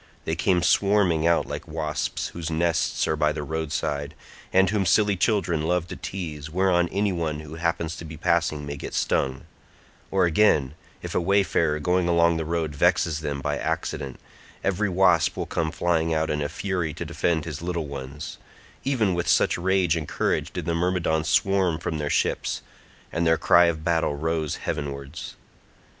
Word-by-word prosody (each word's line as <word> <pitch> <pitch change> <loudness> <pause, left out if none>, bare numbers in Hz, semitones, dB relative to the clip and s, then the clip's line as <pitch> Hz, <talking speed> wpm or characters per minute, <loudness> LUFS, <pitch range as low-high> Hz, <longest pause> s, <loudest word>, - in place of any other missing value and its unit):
They 80 - -1
came 90 0 +2
swarming 95 -4 +3
out 85 -1 +3
like - - -6
wasps 75 -1 -2
whose 85 -2 -5
nests 80 0 +1
are 80 - +1
by 75 0 +2
the 75 - -4
roadside, 75 -1 -3 0.4
and 95 +1 +5
whom 100 +1 +1
silly 100 +3 +3
children 90 -4 +1
love 90 0 0
to - - -5
tease, 80 -6 -6
whereon 90 0 +2
any 100 0 0
one 80 -4 -2
who 75 0 -10
happens 85 0 -2
to 85 - -8
be 80 0 -8
passing 85 -3 +1
may 70 0 -5
get - - -6
stung—or 65 +5 -2
again, 80 -6 +3 0.3
if - - -5
a - - +1
wayfarer 85 -4 +2
going 90 +3 +1
along 85 -1 +3
the 80 - -2
road 80 -2 -1
vexes 75 +2 +2
them 70 -2 -3
by 75 +1 -1
accident, 65 -2 -3 0.4
every 100 +1 +1
wasp 90 -4 +3
will - - -2
come 80 -1 -1
flying 80 -1 0
out 80 0 0
in 75 0 -1
a 75 - -1
fury 85 -2 -2
to - - -5
defend 85 -2 0
his 80 -3 -6
little 85 -2 -2
ones—even 75 - -4
with 85 0 -2
such - - +3
rage 90 -1 +2
and 80 -3 -3
courage - - -1
did 90 - -5
the 85 - 0
Myrmidons 85 -2 0
swarm 95 -5 +2
from 80 -1 -3
their 75 -1 -2
ships, - - 0 0.5
and 85 0 0
their 80 0 +4
cry 85 +2 +5
of 80 -2 -1
battle 80 -3 +1
rose 80 0 -1
heavenwards. 70 +1 -5
85 Hz, 175 wpm, -25 LUFS, 75-90 Hz, 0.5 s, and